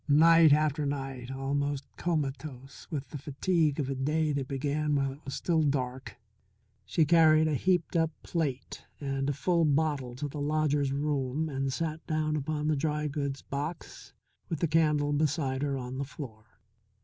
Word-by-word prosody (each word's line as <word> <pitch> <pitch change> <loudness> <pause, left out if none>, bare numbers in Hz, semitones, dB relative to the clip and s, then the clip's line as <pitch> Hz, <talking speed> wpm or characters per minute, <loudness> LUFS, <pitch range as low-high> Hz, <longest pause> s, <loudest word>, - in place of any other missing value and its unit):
Night 165 +2 +7
after 150 0 +3
night, 135 -3 -4
almost 140 +1 -1
comatose 140 -4 -3
from 150 -4 -2
the 145 - -5
fatigue 155 +2 0
of 140 - 0
a 135 - -1
day 150 +3 0
that 140 -2 -2
began 145 +2 -1
while 135 -1 +1
it 140 +3 -13
was 135 - -4
still 165 -3 +1
dark, 130 -3 -2 0.7
she 160 - +3
carried 155 -1 +5
a 155 - +1
heaped 180 +4 +1
up 165 -1 +3
plate 145 -6 -3 0.2
and 135 -1 -2
a - - +1
full 170 +4 +1
bottle 145 -4 +1
to 145 +3 -3
the 145 +1 -6
lodger's 145 -2 +1
room 145 +1 -1
and 135 -1 -2
sat 160 +2 -3
down 155 -1 0
upon 150 +1 -2
the 155 - +2
dry 150 +1 -1
goods 140 -1 -3
box 145 +4 -6 0.4
with 165 - -2
the 170 - +2
candle 150 -2 +2
beside 145 -3 0
her 140 -1 0
on 130 +1 -5
the - - 0
floor. 125 -6 -9
145 Hz, 170 wpm, -29 LUFS, 135-155 Hz, 0.7 s, Night